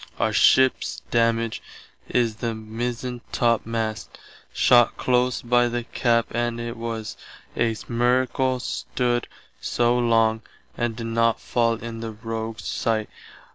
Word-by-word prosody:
Our - - 0
ships 130 0 +3
damage 115 -1 +1 0.5
is 115 -3 +1
the 115 0 -2
Mizentopmast 115 -1 -2 0.4
shott 120 -1 +4
close 125 0 +1
by 120 0 +3
the 120 0 -2
cap 115 0 +1
and 120 0 -1
it 120 0 -4
was 115 -2 -5 0.4
a 115 -1 +1
miracle 125 +2 +1
stood 120 0 -1 0.3
soe 120 +1 +1
long 115 -2 +3 0.3
and 120 -2 -1
did 115 0 -5
not 115 0 +1
fall 115 -1 +1
in 115 0 -7
the 115 0 -4
rogues 115 0 -5
sight. 110 -2 -1
115 Hz, 120 wpm, -24 LUFS, 115-120 Hz, 0.5 s, shott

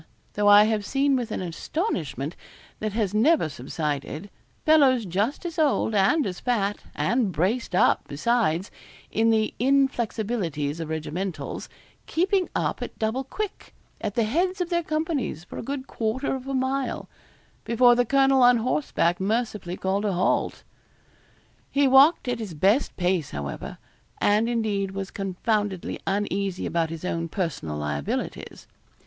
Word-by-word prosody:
Though 205 0 +1
I 205 0 +9
have 215 -1 0
seen 275 +4 +2
with 245 -3 -2
an 200 - -3
astonishment 165 - -3 0.4
that 215 -1 -3
has 210 -3 0
never 255 - +4
subsided, 150 +6 -4 0.3
fellows 275 -7 +5
just 205 - -1
as 335 -2 -4
old 285 -7 +2
and 245 +10 +3
as 180 -2 -4
fat, 210 -5 0 0.2
and 235 -4 +1
braced 185 +7 0
up, - - +3
besides, 190 +1 0 0.4
in 225 +1 +2
the 220 -1 +2
inflexibilities 225 - 0
of 165 -1 -4
regimentals, 160 +4 -4 0.4
keeping 370 +2 +1
up - - -1
at - - -6
double 220 +4 -1
quick, 415 +9 -6 0.3
at 205 - -2
the 235 - +3
heads 355 - 0
of 360 0 -2
their 345 0 +2
companies, 310 - -2
for - - -8
a - - -3
good 275 +1 -4
quarter 235 +3 -2
of 265 0 -5
a 275 - -2
mile, 260 +1 -1 0.6
before 240 +1 +5
the 245 +1 +3
colonel 270 +1 +4
on 245 0 +7
horseback 225 - 0
mercifully 205 -3 -2
called 195 +2 -1
a 200 - +1
halt. 180 +1 0 1.1
He 280 0 +3
walked 270 +3 +6
at 245 -1 -1
his 205 -7 -6
best 200 - +2
pace, 180 -4 0
however, 70 -1 -6 0.4
and 215 +3 +3
indeed 215 -4 0
was 195 0 -5
confoundedly 195 0 -2
uneasy 195 -1 -1
about 165 -1 0
his 165 +2 -6
own 165 -2 -2
personal 155 - -3
liabilities. 75 -1 -4
215 Hz, 145 wpm, -25 LUFS, 180-265 Hz, 1.1 s, I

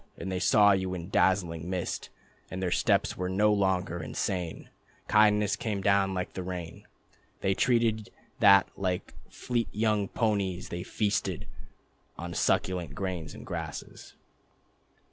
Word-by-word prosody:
And 95 - -5
they 90 - -1
saw 105 +3 +5
you 95 -1 0
in 85 0 -6
dazzling 85 -4 +1
mist. 90 -2 -3 0.4
And 95 - -5
their 90 -2 -1
steps - - +2
were 90 0 -2
no 105 +3 +3
longer 95 -3 0
insane, 90 -4 -3 0.4
Kindness 105 -1 +4
came 105 -3 -3
down 100 -1 +3
like 90 -1 -3
the 95 - -4
rain, 90 -3 -7 0.5
They 95 - +2
dreamed 115 -1 +1 0.3
that 100 0 +7
like 90 -2 -2 0.2
fleet 120 -3 -2
young 105 -1 +1
ponies 100 -5 -1
they 85 - -4
feasted 100 +1 -1 0.7
On 85 +1 -6
succulent 90 0 0
grasses 90 -6 -4
and - - -10
grain... - - -4
95 Hz, 135 wpm, -29 LUFS, 90-105 Hz, 0.7 s, that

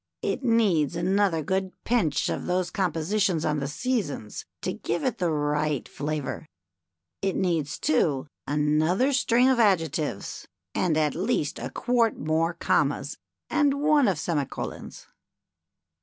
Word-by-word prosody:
" - - -61
It - - -7
needs 205 - +2
another 180 -1 +1
good 190 +3 -1
pinch 215 - +1
of - - -3
those 180 0 0
compositions 180 0 0
on 150 -1 +1
the 140 - -2
Seasons 245 - -3 0.2
to - - -1
give - - -3
it 260 -5 -1
the 175 -2 +1
right 150 -2 0
flavor. 150 +1 -4 0.7
It 195 -1 0
needs, 165 -6 0
too, 150 -3 +1 0.2
another 155 - +2
string 250 -1 +3
of 260 -2 +3
adjectives 165 - 0 0.3
and 170 -4 +1
at 150 -2 +2
least 145 - -1
a - - -4
quart 240 -2 +1
more 160 +3 0
commas - - 0 0.3
and 285 -2 +2
one 295 -2 +4
of 190 -5 +1
semi 150 -2 -1
colons." - - -7
175 Hz, 140 wpm, -26 LUFS, 150-215 Hz, 0.7 s, one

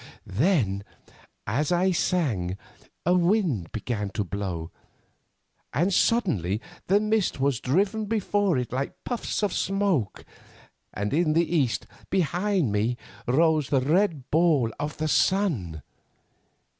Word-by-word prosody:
"Then, 105 - +1 0.6
as 140 - 0
I 180 +2 +3
sang, 125 - 0 0.5
a 175 - +4
wind 175 - +1
began 105 -2 -3
to 105 - -1
blow, 90 -4 -4 1.0
and 180 +6 +2
suddenly 145 - +2 0.3
the 200 +2 +4
mist 215 -6 0
was 135 -3 +1
driven 200 - +1
before 205 -5 +1
it 125 -2 -3
like 135 +2 -4
puffs 240 -3 -3
of 205 - +1
smoke, 195 - 0 0.7
and 105 +3 -3
in 155 0 +2
the 170 +1 +1
east 135 -8 +1 0.2
behind 180 - +1
me 110 +4 0 0.3
rose 155 +2 +3
the 135 - +3
red 155 -1 +1
ball 155 -8 +3
of 150 0 -4
the 155 - -1
sun. 140 - +1
155 Hz, 120 wpm, -26 LUFS, 115-190 Hz, 1.0 s, a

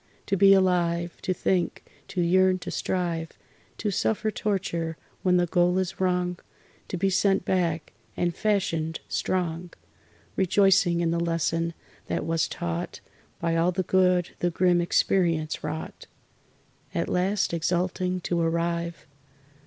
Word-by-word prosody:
To 195 - 0
be 195 +1 +6
alive, 175 -2 +1
To - - -1
think, 180 -1 0 0.2
to 180 - -2
yearn, 185 +2 +4
to - - -5
strive, 170 -3 -2 0.4
To 210 - -1
suffer 215 +2 0
torture 170 -6 -2 0.2
when 180 -1 +3
the 175 - +3
goal 175 +1 +2
is 190 0 -2
wrong, 180 -1 0 0.5
To 185 - -4
be 195 +2 +1
sent 195 0 +2
back 170 -4 0 0.2
and 175 -1 0
fashioned 165 -6 0
strong 175 -1 -2 0.7
Rejoicing 190 -2 +3
in 165 -1 +1
the 170 - 0
lesson 165 0 0 0.3
that - - -2
was 165 0 +1
taught 175 0 -4 0.4
By 165 -1 0
all 165 +2 +3
the 185 +1 -1
good 180 -1 +2
the 175 - +1
grim 175 0 +2
experience 170 -3 +1
wrought; 155 +1 -6 0.9
At - - 0
last, 185 +1 0
exulting, 180 +2 -1
to 170 0 -1
arrive.... 170 +1 -1
175 Hz, 135 wpm, -26 LUFS, 170-185 Hz, 0.9 s, be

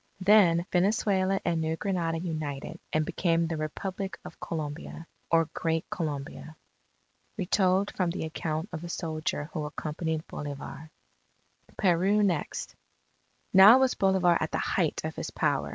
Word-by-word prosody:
Then 185 -4 +5
Venezuela 195 0 +2
and 170 -2 +1
New 160 0 -1
Granada 170 -3 -1
united, 155 -2 -4
and 155 0 +1
became 170 -1 +1
the 165 0 -2
Republic 185 +5 -4
of - - -10
Colombia 155 +1 -5 0.2
or 165 -1 +4
Great 165 0 -1
Colombia. 155 -1 -5 0.8
Retold 190 0 +1
from 180 -3 +1
the 170 -1 -3
account 160 +3 -3
of 160 0 -5
a 175 - -6
soldier 155 -2 -3
who 155 - -2
accompanied 155 +2 -3
Bolivar 145 +2 -7 0.9
PERU 195 +3 +3
NEXT 175 -7 -1 0.8
Now 195 +6 +10
was 265 -1 +3
Bolivar 190 -3 +3
at - - 0
the - - -2
height - - 0
of - - -4
his - - -4
power. 70 0 0
170 Hz, 135 wpm, -28 LUFS, 155-190 Hz, 0.9 s, Now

